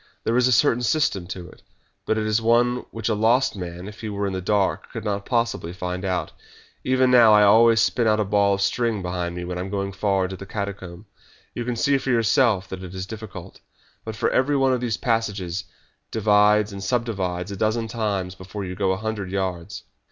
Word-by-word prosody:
There 115 - 0
is 125 0 +4
a - - +2
certain 120 0 +3
system 115 - 0
to 90 -1 -7
it, - - -17 0.5
but 110 - +1
it 110 - -1
is 110 +1 +1
one 120 +2 +2
which 115 -2 -5
a 115 - +2
lost 115 +5 +2
man, 90 0 -7
if 105 +1 -10
he 110 - -4
were 100 0 -2
in 100 - -2
the 95 - -3
dark, 100 +1 0
could - - -6
not 100 -1 -2
possibly 115 -8 -1
find 90 0 -4
out. 95 -2 -2 0.5
Even 130 0 +2
now 120 -3 +7
I 105 0 +6
always 115 +2 +6
spin 120 0 +1
out 110 0 +3
a 105 - +1
ball 100 0 +2
of 100 - -5
string 115 -1 0
behind 90 -1 -3
me 90 0 -5
when 90 0 -4
I - - -2
am 95 - -5
going 100 0 -2
far 100 -1 0
into 95 +1 -3
the 100 +1 -10
catacomb. 100 -2 -6 0.5
You 120 - -4
can 125 0 -2
see 140 +3 +2
for 135 - -5
yourself 115 -3 +2
that 95 -1 -6
it 90 0 -9
is 95 0 -4
difficult, 100 -4 -9 0.4
but 110 -1 -6
every 140 +2 +2
one 135 -1 +3
of 125 - -1
these 115 -3 -1
passages 100 -7 -2 0.4
divides 105 -1 +3
and 100 0 -7
subdivides 100 -7 -2
a - - -4
dozen 110 +3 0
times 100 -5 -2
before 95 +2 -7
you 90 - -5
go 95 0 0
a - - -3
hundred 105 -2 -4
yards." 95 -3 -4
105 Hz, 220 wpm, -23 LUFS, 95-115 Hz, 0.5 s, now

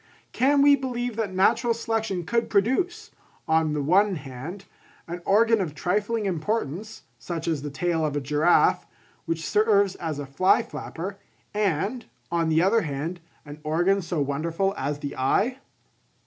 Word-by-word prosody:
Can 280 +2 +3
we 285 0 +7
believe 245 -3 -3
that 220 -4 -1
natural 200 +5 +2
selection 220 -6 -2
could 235 +5 0
produce, 345 - 0 0.4
on 160 -1 +2
the 150 -1 -1
one 190 +6 +3
hand, 150 +7 -8 0.4
an 175 +1 -6
organ 225 +2 +4
of 155 -5 -4
trifling 210 +6 -1
importance, 195 +2 -3 0.2
such 165 +6 -5
as 160 -4 0
the 145 - -4
tail 165 +3 -1
of 150 -2 -1
a - - +1
giraffe, 150 +5 +3 0.4
which 165 -2 -2
serves 205 -2 +3
as 160 -5 -4
a 145 - -4
fly 140 +8 +3
flapper, 195 +4 -7 0.3
and, 210 - -1 0.3
on 165 -1 +1
the 160 +2 +3
other 220 +4 +3
hand, 160 +2 -4 0.3
an 145 +1 -10
organ 175 +6 +2
so 170 -2 -3
wonderful 165 +7 -1
as 140 +2 -2
the 145 -1 -6
eye? 205 - +1
180 Hz, 155 wpm, -25 LUFS, 155-220 Hz, 0.4 s, we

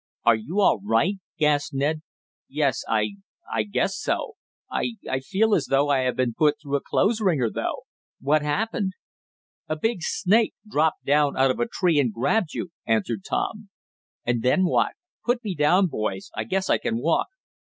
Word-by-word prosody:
"Are 120 - +7
you 160 - -2
all 190 - +4
right?" 115 - +1 0.2
gasped 145 -2 +1
Ned. 150 +3 0 0.5
"Yes 140 -2 0
I 105 -2 0 0.4
I 115 - +2
guess 110 - -1
so. 460 - -2 0.3
I 235 - -2
I 130 - 0
feel 205 +10 +1
as 160 - +2
though 140 +1 +2
I 140 -2 +3
had 130 -1 0
been 125 -2 +1
put 150 +3 +3
through 145 -2 -3
a - - -6
clothes 215 +3 +1
wringer 150 - +2
though. - - -3 0.4
What 145 +4 +2
happened?" 195 +6 -1 0.8
"A 155 - 0
big 205 +4 -1
snake 210 +7 +2
dropped 160 -5 0
down 145 0 +3
out 135 0 +4
of - - -4
a 240 - +1
tree 180 -8 +2
and 125 -5 +2
grabbed 150 - 0
you," - - -3 0.2
answered 110 -2 0
Tom. - - -3 0.6
"And 120 -1 0
then 155 +10 +3
what? 175 - +2 0.3
Put 245 0 0
me 205 -4 -2
down, 175 +5 +4
boys, 105 - -3
I 110 - -3
guess 190 +10 -1
I - - +3
can 115 - -1
walk." 155 +7 +1
150 Hz, 180 wpm, -24 LUFS, 125-190 Hz, 0.8 s, Are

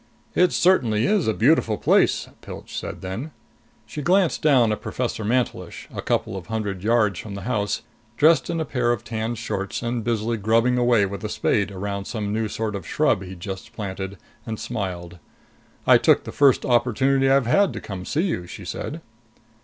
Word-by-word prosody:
"It 180 0 +4
certainly 120 - +3
is 200 - +2
a - - +4
beautiful 115 -4 +3
place!" - - +3
Pilch - - -9
said - - -5
then. 95 +11 -5 0.6
She 130 +8 -6
glanced 180 +2 +2
down 130 -7 +4
at 105 - -3
Professor 120 -3 -3
Mantelish, 120 +4 -2
a - - -4
couple - - -1
of 95 -2 -7
hundred 105 -4 -3
yards 105 -4 +2
from 105 -2 -7
the 100 - -7
house, 105 -3 -1 0.3
dressed 160 +3 +4
in 170 -1 -1
a 160 - -1
pair 125 -4 0
of 120 -3 -2
tanned 115 0 -3
shorts 100 -1 -4
and 120 -1 -2
busily 115 0 -1
grubbing 115 +4 +2
away 120 -4 +4
with 100 +1 -6
a 105 - -3
spade 100 -1 +1
around 100 0 -4
some 105 -2 -3
new 110 0 0
sort 110 0 -3
of 95 -5 -6
shrub - - +2
he'd 95 -2 -9
just 95 0 -7
planted, 95 -2 -5 0.3
and 110 -2 -5
smiled. 90 -7 -5 0.7
"I - - +7
took - - +4
the - - -7
first 140 -2 +4
opportunity 130 +3 +2
I've 135 -2 +4
had 195 - +3
to - - -5
come 95 -3 -7
see 150 - -1
you," 90 - -2
she - - -9
said. - - -5
110 Hz, 185 wpm, -23 LUFS, 100-125 Hz, 0.7 s, I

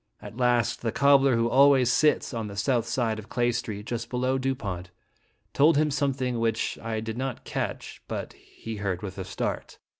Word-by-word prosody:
At - - -10
last, 120 -2 +1
the 115 - -1
cobbler 140 0 +4
who 115 0 +2
always 130 0 +5
sits 150 -1 +2
on 115 -2 -3
the 100 - -8
south 120 +2 +1
side 115 -4 -1
of 110 - -11
Clay 120 0 +1
Street, 110 -3 -4
just 115 0 -4
below 130 +1 0
Dupont, 105 -10 -3 0.6
told 150 +2 +5
him 150 0 +2
something 135 -4 -1
which 115 -1 -1
1 110 -1 -3
did 110 +1 -5
not 130 -2 -4
catch, - - -4
but - - -5
he 115 -1 -9
heard 100 -2 -3
with 95 -1 -6
a - - -3
start. 95 - -4
120 Hz, 185 wpm, -26 LUFS, 110-130 Hz, 0.6 s, always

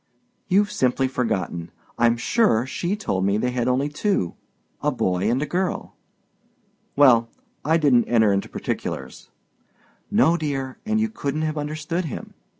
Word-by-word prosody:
"You've 205 +2 +3
simply 130 -7 +1
forgotten. 95 -9 -2 0.3
I'm 120 0 +3
sure 125 - +2
she 170 +9 -2
told 95 - -2
me 100 +1 +2
they 125 +3 0
had 125 -1 -1
only 130 +3 +2
two—a 145 - -3
boy 95 +3 0
and 120 +3 +1
a - - -1
girl." 180 +5 -2 1.0
"Well, 120 -5 +5 0.3
I 160 +3 +3
didn't 135 -7 +4
enter 110 -4 +3
into 100 - -1
particulars." - - -5 0.8
"No, 170 +2 +4
dear, 135 -4 -3
and 220 0 +2
you 220 - +2
couldn't 155 -8 -3
have 155 0 -1
understood 155 +4 -3
him. 150 - -7
135 Hz, 145 wpm, -23 LUFS, 115-165 Hz, 1.0 s, Well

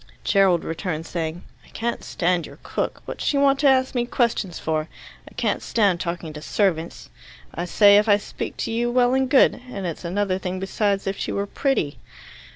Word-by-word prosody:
Gerald 190 -4 +3
returned, 165 -1 -4
saying, 165 0 -4 0.2
"I - - -21
can't 235 +1 -3
stand 175 -1 0
your - - -13
cook. - - -3
What's - - -6
she 285 - +1
want 280 -1 +3
to 285 - +4
ask 260 -1 +2
me 240 -1 0
questions 225 -8 0
for? 155 0 -2 0.4
I - - -20
can't - - 0
stand 200 -6 +1
talking 170 -2 -4
to 150 - -8
servants. 165 - -1 0.4
I - - -3
say, 200 +3 +6
'If 210 +1 0
I 205 - +6
speak 205 - -6
to - - -4
you, 235 +1 0
well 245 0 +3
and 265 -1 +1
good' 260 -2 +4
and 195 -6 -5
it's 170 0 -5
another 185 +2 -1
thing 185 0 -4
besides 195 +1 -1
if 195 0 -2
she - - -2
were 200 - -1
pretty." 205 - -1
195 Hz, 195 wpm, -23 LUFS, 170-235 Hz, 0.4 s, say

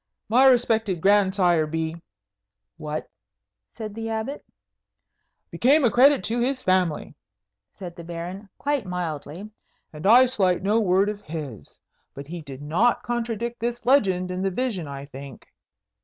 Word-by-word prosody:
"My 250 +4 +5
respected 225 -7 +2
grandsire 190 -4 +3
be 160 +1 -3 0.4
" 100 - -60 0.3
"What?" 155 -1 -5 0.7
said 215 -2 -6
the 225 +1 -5
Abbot. 225 +6 -4 1.1
"Became 280 +5 +3
a 235 - +4
credit 265 +1 +5
to 230 +6 -1
his 255 +2 -1
family," 185 -4 0 0.6
said 175 -3 -9
the 170 - -9
Baron, 175 +4 -7
quite 285 -7 -1
mildly; 175 +2 -5 0.4
"and 155 +5 -4
I 245 +4 +8
slight 190 -8 +1
no 210 +3 +2
word 195 -1 +2
of 210 -1 -4
his. 145 - -8 0.4
But 140 - -8
he 170 +3 -7
did 140 -2 -10
not 180 +11 +1
contradict 235 0 -3
this 240 +1 -3
legend 190 -9 +2
in 180 0 -3
the 195 - +1
vision, 195 - -3
I 140 0 -7
think." 140 -2 -11
190 Hz, 145 wpm, -24 LUFS, 165-235 Hz, 1.1 s, I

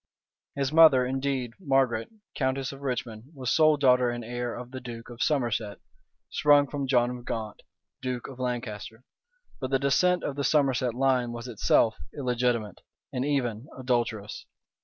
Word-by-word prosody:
His 140 -1 -1
mother 155 -6 +7
indeed, 130 -1 -2
Margaret, 135 -8 +1 0.3
countess 130 -1 -1
of 135 0 -11
Richmond, 120 -4 -4
was 130 -2 -2
sole 155 -1 +5
daughter 125 -3 +4
and 120 -1 -4
heir 120 0 -4
of 125 0 -8
the 130 -1 -7
duke 120 -1 -8
of 120 - -9
Somerset, 115 -8 0 0.5
sprung 145 -1 +4
from 140 -1 -3
John 125 -1 +2
of 120 - -10
Gaunt, 110 -3 -5 0.4
duke 125 -2 -3
of 130 -2 -11
Lancaster: 120 -2 -4 0.6
but 130 - -3
the 135 - +3
descent 175 +7 +2
of 140 - -3
the 140 - -1
Somerset 135 -5 +2
line 130 -2 +1
was 120 +1 -7
itself 110 -1 +2 0.2
illegitimate, 125 -5 -1 0.3
and 125 - -1
even 130 -4 -1
adulterous. 120 -5 -2
125 Hz, 155 wpm, -27 LUFS, 120-135 Hz, 0.6 s, mother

